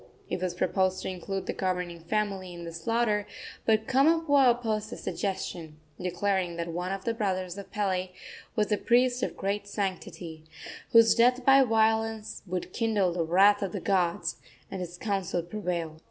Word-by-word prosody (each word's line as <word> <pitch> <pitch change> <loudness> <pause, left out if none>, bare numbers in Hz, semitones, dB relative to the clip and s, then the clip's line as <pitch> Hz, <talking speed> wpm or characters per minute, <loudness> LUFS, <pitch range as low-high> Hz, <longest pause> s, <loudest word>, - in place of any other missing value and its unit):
It - - -2
was 180 -1 -2
proposed 185 +1 0
to - - -2
include 190 +1 -4
the - - -2
governing 180 -2 -2
family 190 0 -2
in 170 - -8
the 165 - -6
slaughter, 210 +4 0 0.4
but 220 -1 +3
Kamapuaa 285 0 +4
opposed 220 -3 0
the - - -7
suggestion, 180 -6 -4 0.2
declaring 180 0 -1
that 170 0 -4
one 180 +2 -3
of 195 -1 -4
the 230 - +1
brothers 185 -5 -2
of 200 -1 -9
Pele 185 -3 -1 0.5
was 210 0 +1
a 210 - +2
priest 250 +1 +3
of - - -2
great 200 +1 -2
sanctity, 185 -5 -4 0.5
whose 230 -1 +7
death 245 +2 +3
by 270 0 +7
violence 225 -2 +1
would 180 0 -4
kindle 210 -6 +1
the 170 -1 0
wrath 195 +5 +5
of 195 -3 -2
the - - -2
gods; 175 -3 0 0.3
and 190 - -4
his 175 0 -6
counsel 190 -4 -1
prevailed. 170 -4 -4
195 Hz, 170 wpm, -28 LUFS, 180-220 Hz, 0.5 s, whose